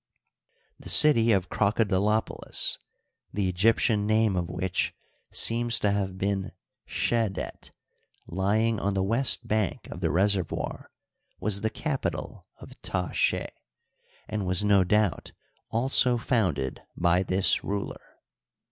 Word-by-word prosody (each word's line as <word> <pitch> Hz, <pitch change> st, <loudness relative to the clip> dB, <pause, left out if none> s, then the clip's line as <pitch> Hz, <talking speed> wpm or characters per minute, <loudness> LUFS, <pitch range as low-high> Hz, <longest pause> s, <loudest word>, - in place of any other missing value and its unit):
The -, -, -6 dB
city 115 Hz, -7 st, +6 dB
of 95 Hz, -4 st, +1 dB
Crocodilopolis, 105 Hz, 0 st, +1 dB, 0.5 s
the 100 Hz, -2 st, -1 dB
Egyptian 105 Hz, +3 st, +2 dB
name 110 Hz, -2 st, +2 dB
of 85 Hz, -1 st, -2 dB
which 95 Hz, -2 st, -2 dB, 0.4 s
seems 115 Hz, 0 st, +2 dB
to 105 Hz, -, +2 dB
have 95 Hz, -2 st, -2 dB
been 95 Hz, 0 st, -2 dB, 0.3 s
Skedet, 115 Hz, -5 st, -2 dB, 0.6 s
lying 105 Hz, +5 st, 0 dB
on 100 Hz, 0 st, -1 dB
the 95 Hz, -, +1 dB
west 115 Hz, +7 st, +2 dB
bank 105 Hz, -3 st, -1 dB
of -, -, -7 dB
the -, -, 0 dB
reservoir, 95 Hz, -2 st, -1 dB, 0.5 s
was 100 Hz, +1 st, 0 dB
the 110 Hz, -, 0 dB
capital 135 Hz, +4 st, -4 dB
of -, -, -14 dB
Ta 90 Hz, -1 st, -3 dB
ske, -, -, 0 dB, 0.8 s
and 105 Hz, -3 st, -3 dB
was 95 Hz, +2 st, +1 dB
no 100 Hz, -2 st, +4 dB
doubt 105 Hz, 0 st, 0 dB, 0.4 s
also 125 Hz, +1 st, +2 dB
founded 90 Hz, -, -1 dB, 0.2 s
by 85 Hz, +1 st, +2 dB
this 95 Hz, +1 st, +2 dB
ruler. 100 Hz, 0 st, -5 dB
100 Hz, 120 wpm, -27 LUFS, 95-110 Hz, 0.8 s, city